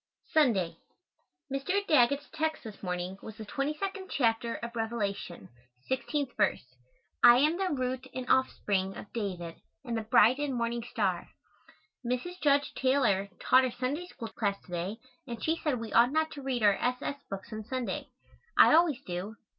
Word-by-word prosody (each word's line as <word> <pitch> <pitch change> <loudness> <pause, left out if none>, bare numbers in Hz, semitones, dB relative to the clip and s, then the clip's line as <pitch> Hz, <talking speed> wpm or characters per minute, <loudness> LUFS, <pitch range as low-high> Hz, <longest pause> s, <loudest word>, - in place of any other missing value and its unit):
Sunday. 195 - +3 0.8
Mr. 365 +9 0
Daggett's 280 -1 +3
text 315 0 -1
this 215 -3 -9
morning 180 +1 -4
was 220 - -9
the 220 - -7
22nd 340 - -3
chapter 230 -2 +1
of 235 0 -7
Revelation, 220 - -3 0.4
16th 275 +1 -1
verse, 130 -11 0 0.5
"I 240 0 +9
am 305 +6 +3
the 380 -1 0
root 260 -2 -2
and 255 -1 -5
offspring 195 -7 +1
of 205 - -10
David 180 -7 -4 0.3
and 235 -2 -2
the 225 - -1
bright 235 +3 +5
and 290 -3 -1
morning 235 0 -1
star." 190 -5 -1 0.7
Mrs. 250 +10 -3
Judge 285 -1 +3
Taylor 240 -8 +2
taught 260 +1 +5
our 255 - +1
Sunday 275 +9 -3
School 230 -10 -8
class 200 -3 -1
to - - -16
day 180 +5 -3 0.3
and 235 -2 -6
she 320 - +2
said 290 -7 -1
we 225 -2 -6
ought 240 +2 +6
not 315 +1 +1
to 285 - -8
read 260 -4 -2
our 205 -1 +6
S. 250 0 0
S. 280 0 -4
books 195 +4 -7
on 215 0 -5
Sunday. 255 +2 -3 0.5
I - - +8
always 310 -5 +4
do. 185 +5 -5
240 Hz, 170 wpm, -30 LUFS, 210-280 Hz, 0.8 s, I